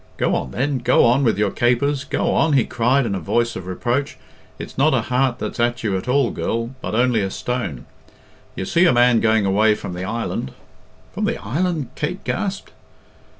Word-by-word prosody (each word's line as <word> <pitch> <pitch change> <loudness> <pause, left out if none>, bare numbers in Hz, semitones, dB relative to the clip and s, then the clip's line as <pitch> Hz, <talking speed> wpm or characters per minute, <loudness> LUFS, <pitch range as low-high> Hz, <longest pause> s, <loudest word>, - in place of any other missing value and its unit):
"Go - - +1
on, 65 - -1
then; 135 - -1
go 120 +1 +4
on 125 +4 +3
with 110 -6 +2
your 105 -1 +1
capers! 135 +4 +1
Go - - 0
on!" 160 - +2
he 135 -4 +3
cried, 125 +3 +1
in 105 - -2
a 95 - -2
voice 120 +8 0
of 90 -1 -7
reproach. 120 +9 -2 0.4
"It's - - -8
not - - +3
a - - +2
heart 125 0 0
that's - - -5
at 120 +1 0
you 105 -4 0
at 95 - -4
all, 130 -1 +2
girl, 115 +1 -2
but - - -3
only 120 -2 +2
a 95 - -1
stone. 95 - -4 0.7
You 95 - -4
see 170 - +3
a - - +4
man 120 -1 +4
going 110 -2 +2
away 105 +3 +3
from 90 - -7
the 90 +1 -5
island 105 - -3 0.3
" - - -30
"From - - -2
the - - -1
island?" 155 - -2
Kate 180 +7 -4
gasped. 195 -1 -3
120 Hz, 205 wpm, -21 LUFS, 105-135 Hz, 0.7 s, go